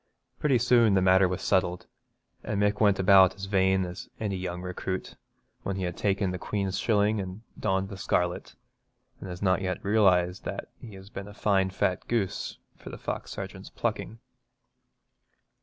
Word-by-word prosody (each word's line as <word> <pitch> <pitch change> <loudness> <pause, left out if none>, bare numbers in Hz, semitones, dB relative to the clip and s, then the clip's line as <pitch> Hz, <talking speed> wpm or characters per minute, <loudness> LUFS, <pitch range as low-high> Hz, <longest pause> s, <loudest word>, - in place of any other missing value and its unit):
Pretty 140 -4 +3
soon 120 -3 +4
the - - +5
matter 95 0 +5
was 90 0 -4
settled, 90 -2 +1 0.6
and 100 - -2
Mick 105 +1 +2
went 100 -3 +4
about 95 -1 +6
as 100 0 -6
vain 95 -1 +2
as 90 +1 -8
any 105 -3 -2
young 90 -1 -4
recruit 90 +1 -4 0.5
when 100 - -3
he 95 - -3
has 90 -1 -2
taken 100 0 0
the 90 - -4
Queen's 100 -1 -2
shilling 105 -1 +2
and 95 +3 -6 0.2
donned 95 -1 0
the 100 - -7
scarlet, 90 -1 -1 0.6
and 95 - -8
has 90 +2 -6
not 95 0 +3
yet 90 -1 -1
realised 95 -4 +3
that - - -5
he 110 -4 -10
has 95 +2 -13
been 95 +1 -7
a 105 - -11
fine 95 -3 +2
fat 95 -1 -1
goose 115 -5 -2 0.2
for - - -11
the - - -8
fox - - -5
sergeant's - - -7
plucking. 115 - -3
95 Hz, 175 wpm, -28 LUFS, 95-105 Hz, 0.6 s, about